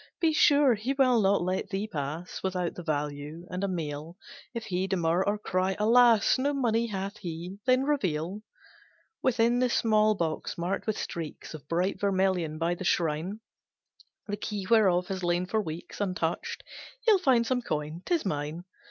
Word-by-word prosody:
Be 325 -2 +3
sure, 285 -3 +5
he 230 +5 -2
will 255 -4 +4
not 195 -1 +3
let 185 +1 -2
thee 195 +1 -2
pass 160 -2 -5
Without 180 -2 -1
the - - -7
value, 150 +1 -3
and 180 +1 -3
a - - +1
meal, 160 -2 -4 0.3
If 235 -2 -5
he 185 0 -1
demur, 175 -1 +1
or 205 +2 0
cry 190 -2 -1
alas! 230 +1 +5
No 285 +2 +1
money 235 -3 +1
hath 200 0 -4
he, 175 +1 -6
then 255 +1 +4
reveal, 190 - -1 0.8
"Within 240 -1 +2
the 250 0 +2
small 215 -2 +3
box, 165 -4 -3
marked 175 +5 -2
with 215 - 0
streaks 165 -2 -6
Of 150 -2 -10
bright 180 +5 0
vermilion, 185 -5 +1
by 165 +2 0
the 175 - -6
shrine, 170 +5 0 0.8
The 205 -1 -3
key 205 -2 -4
whereof 190 -5 +4
has 190 -1 -3
lain 175 +1 +1
for 220 +4 0
weeks 165 +2 -7
Untouched, 180 -4 -2 0.4
he'll 430 -4 +6
find 255 -9 +3
some 250 +1 0
coin, 155 -4 -3
'tis 340 -8 0
mine. 150 0 -3
190 Hz, 170 wpm, -28 LUFS, 170-225 Hz, 0.8 s, he'll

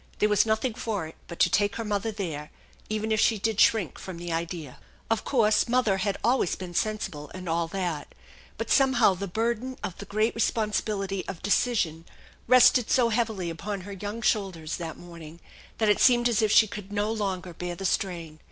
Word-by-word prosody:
There 210 - +2
was 210 +1 +3
nothing 220 +3 0
for 220 -7 -3
it 160 - -10
but 170 - -8
to - - +5
take 205 0 +2
her 230 - -4
mother 205 +1 -1
there, 160 -8 -5 0.4
even 215 +1 -2
if 215 - +2
she 225 0 +3
did 215 +1 -1
shrink 195 - +3
from 185 -3 -7
the 170 0 -4
idea. 165 -4 -4 0.3
Of 225 - +1
course 220 -5 +3
mother 230 -6 +2 0.2
always 240 -6 +2
had - - -4
been 180 -2 -7
sensible, 170 -8 -2
and 185 -1 -7
all 165 0 0
that; 175 -4 -4 0.4
but - - -4
somehow 260 -7 +5
the 195 +2 -5
burden 235 +6 -2
of 180 - -4
the 200 - -7
great 215 +3 0
responsibility 210 -3 -1
of 190 -4 -7
decision 190 -7 +1 0.4
rested 250 0 +6
so 245 -3 +3
heavily 215 -6 -1
upon 200 +4 -5
her 200 +3 -9
young 205 +4 -6
shoulders 185 -7 -1
that 165 -2 -6
morning 170 -2 -11 0.4
that 220 - +1
it 210 - +3
seemed 240 -1 +5
as 230 -3 +1
if 215 -2 +2
she 220 - +7
could 205 -1 -8
not 205 +1 0
longer 190 -3 -3
bear 175 +1 -5
the 195 - -6
strain. 170 -5 -2
205 Hz, 195 wpm, -27 LUFS, 175-220 Hz, 0.4 s, she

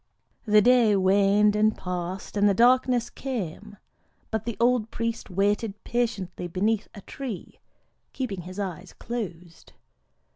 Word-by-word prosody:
The 210 -1 +5
day 240 -3 +5
waned 200 +2 +4
and 215 +1 +2
passed, 180 +2 -5
and 205 0 +4
the 200 - +2
darkness 245 +1 +4
came; 210 - -6 0.5
but 220 -1 -2
the 235 -2 -4
old 235 -2 +2
priest 230 0 -3
waited 200 +2 0
patiently 210 -8 -2
beneath 205 +5 0
a 200 - -9
tree, 245 -2 -7 0.5
keeping 210 -9 -4
his 185 +2 -10
eyes 190 -2 -5
closed. 180 -8 -7
210 Hz, 125 wpm, -26 LUFS, 190-230 Hz, 0.5 s, The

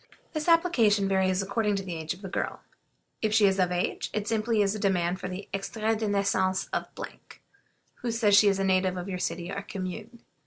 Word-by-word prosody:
This 310 0 -3
application 240 - +4
varies 190 0 +2
according 205 +1 0
to 195 - -2
the 180 -3 -5
age 160 +1 -3
of 195 - -17
the - - -4
girl. 185 - -3 0.6
If 215 -1 +1
she 215 -2 +6
is 195 0 +2
of 180 -1 +2
age 180 0 -1
it 210 - -1
is - - -5
simply 220 -1 +2
a - - +2
demand 185 -3 0
for - - -4
the 185 +2 -6
"extrait 215 +3 -1
de 220 - -1
naissance 195 -2 +1
of, - - -1 1.1
who 245 - -4
says 220 -3 +3
she 205 - +7
is 195 -1 +3
a 195 - 0
native 185 -1 +2
of 180 +1 -5
your 185 -2 -4
city 170 +1 -3
or 195 - -3
commune." 210 +4 -7
195 Hz, 210 wpm, -28 LUFS, 185-215 Hz, 1.1 s, she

